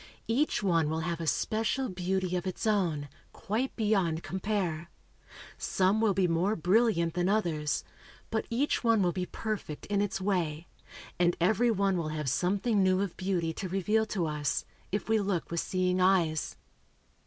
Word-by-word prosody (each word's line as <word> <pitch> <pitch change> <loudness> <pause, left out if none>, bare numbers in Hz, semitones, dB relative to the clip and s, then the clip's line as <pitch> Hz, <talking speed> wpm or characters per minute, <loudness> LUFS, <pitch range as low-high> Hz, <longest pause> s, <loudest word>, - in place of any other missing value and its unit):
Each 255 +1 +1
one 165 -5 +2
will 160 +1 -1
have 170 0 -3
a 165 - -3
special 225 - 0
beauty 185 -1 -1
of 180 0 -2
its 185 - -4
own, 175 -9 +1 0.3
quite 230 +5 -2
beyond 195 -7 +1
compare. 185 -4 -2 0.7
Some 195 +3 +2
will 210 -4 +3
be 190 -2 +3
more 175 +5 +1
brilliant 180 -2 +2
than 180 +1 +1
others, 165 -8 0 0.5
but 220 -1 -1
each 260 +5 0
one 230 -4 +4
will 175 - +2
be 180 0 -3
perfect 215 -9 -5
in 200 -1 0
its 205 -1 -1
way, 175 -5 -1 0.5
and 175 0 +3
every 215 +7 +3
one 200 -3 +2
will 165 -3 -2
have 150 -4 -2
something 200 - +1
new 185 0 +3
of 200 -4 -3
beauty 180 -4 -1
to 185 +3 -5
reveal 210 +4 +1
to 190 -6 -1
us, 150 -2 -1 0.3
if 205 +1 -2
we 220 0 +3
look 195 -5 -2
with 170 - 0
seeing 185 0 0
eyes. 175 -5 +2
185 Hz, 165 wpm, -30 LUFS, 170-210 Hz, 0.7 s, one